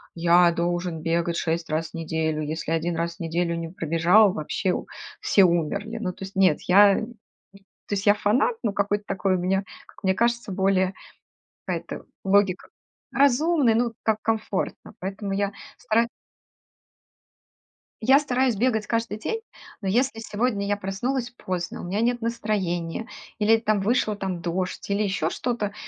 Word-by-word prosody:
"Я 170 Hz, +1 st, +5 dB
должен 175 Hz, -1 st, -2 dB
бегать 170 Hz, +1 st, 0 dB
6 165 Hz, 0 st, -1 dB
раз 155 Hz, +1 st, -2 dB
в -, -, -36 dB
неделю. 160 Hz, -1 st, -1 dB
Если 160 Hz, +1 st, -4 dB
1 165 Hz, +1 st, 0 dB
раз 170 Hz, 0 st, -2 dB
в -, -, -34 dB
неделю 170 Hz, +1 st, -1 dB
не 165 Hz, -1 st, -4 dB
пробежал, 175 Hz, +5 st, +4 dB
вообще 180 Hz, +4 st, -1 dB
у -, -, -4 dB, 0.4 s
все 195 Hz, -, +4 dB
умерли". 190 Hz, +6 st, 0 dB
Ну, 190 Hz, -5 st, -2 dB
то 190 Hz, -, -10 dB
есть, 195 Hz, +1 st, -12 dB
нет, 185 Hz, -5 st, +4 dB
я 200 Hz, +2 st, +7 dB
то 220 Hz, -, -4 dB, 0.9 s
есть, 195 Hz, -, -3 dB
я 205 Hz, -, +8 dB
фанат, 235 Hz, -, +2 dB
но 215 Hz, -4 st, 0 dB
какой-то 205 Hz, +1 st, 0 dB
такой 190 Hz, 0 st, 0 dB
у -, -, -1 dB
меня, 190 Hz, +2 st, +1 dB, 0.2 s
как -, -, -19 dB
мне 190 Hz, -, +3 dB
кажется, 235 Hz, -1 st, 0 dB
более 190 Hz, 0 st, +2 dB, 0.7 s
какая-то -, -, -4 dB, 0.2 s
логика 195 Hz, -1 st, +2 dB, 0.4 s
Разумный, 280 Hz, 0 st, +3 dB
ну, 235 Hz, 0 st, +1 dB
как 220 Hz, -1 st, +2 dB
комфортно, 220 Hz, -3 st, -2 dB
поэтому 195 Hz, +2 st, -4 dB
я 200 Hz, 0 st, 0 dB, 0.3 s
стараюсь 230 Hz, 0 st, +1 dB, 1.9 s
я 265 Hz, +5 st, +6 dB
стараюсь 260 Hz, -4 st, +1 dB
бегать 220 Hz, 0 st, +1 dB
каждый 230 Hz, -2 st, -1 dB
день. 450 Hz, -, -3 dB, 0.4 s
Но 195 Hz, -, -3 dB
если 235 Hz, +4 st, +1 dB
сегодня 210 Hz, -2 st, -1 dB
я 205 Hz, 0 st, +1 dB
проснулась 240 Hz, +6 st, -2 dB
поздно, 185 Hz, -7 st, -4 dB
у -, -, -9 dB
меня 195 Hz, +5 st, -1 dB
нет 240 Hz, +1 st, +1 dB
настроения 210 Hz, -5 st, -2 dB, 0.3 s
или, 220 Hz, +2 st, +5 dB
там, 215 Hz, -2 st, 0 dB
вышла, 215 Hz, 0 st, +1 dB
там, 190 Hz, -3 st, -4 dB
дождь 180 Hz, +3 st, -3 dB
или 200 Hz, +1 st, +1 dB
ещё 190 Hz, -5 st, 0 dB
что-то, 215 Hz, -1 st, -2 dB
200 Hz, 160 wpm, -25 LUFS, 175-225 Hz, 1.9 s, я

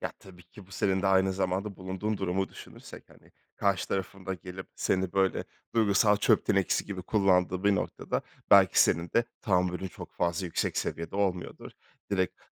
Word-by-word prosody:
Ya, -, -, -3 dB
tabii 90 Hz, -2 st, -15 dB
ki 90 Hz, +3 st, -15 dB
bu -, -, -22 dB
senin 95 Hz, 0 st, 0 dB
de -, -, +1 dB
aynı 95 Hz, 0 st, +3 dB
zamanda 95 Hz, +1 st, -2 dB
bulunduğun 95 Hz, +3 st, -3 dB
durumu 95 Hz, 0 st, -1 dB
düşünürsek, -, -, -12 dB
hani, -, -, -21 dB, 0.2 s
karşı 100 Hz, -2 st, 0 dB
tarafın 95 Hz, 0 st, -4 dB
da 95 Hz, -, -1 dB
gelip 90 Hz, +2 st, -9 dB
seni 95 Hz, -1 st, 0 dB
böyle 95 Hz, -2 st, +1 dB, 0.3 s
duygusal 105 Hz, -2 st, +4 dB
çöp 105 Hz, -, +2 dB
tenekesi 100 Hz, -2 st, +2 dB
gibi 95 Hz, -3 st, -6 dB
kullandığı 95 Hz, -2 st, +2 dB
bir 100 Hz, -1 st, +5 dB
noktada, -, -, -2 dB, 0.3 s
belki 95 Hz, -3 st, +7 dB
senin 85 Hz, +1 st, 0 dB
de 115 Hz, -, +3 dB, 0.2 s
tahammülün 90 Hz, -1 st, 0 dB
çok -, -, -11 dB
fazla 85 Hz, +1 st, -1 dB
yüksek 85 Hz, -, -2 dB
seviyede 85 Hz, +3 st, -4 dB
olmuyordur. 95 Hz, -3 st, -2 dB, 0.4 s
Direkt, 95 Hz, -3 st, -1 dB
95 Hz, 165 wpm, -29 LUFS, 90-100 Hz, 0.4 s, belki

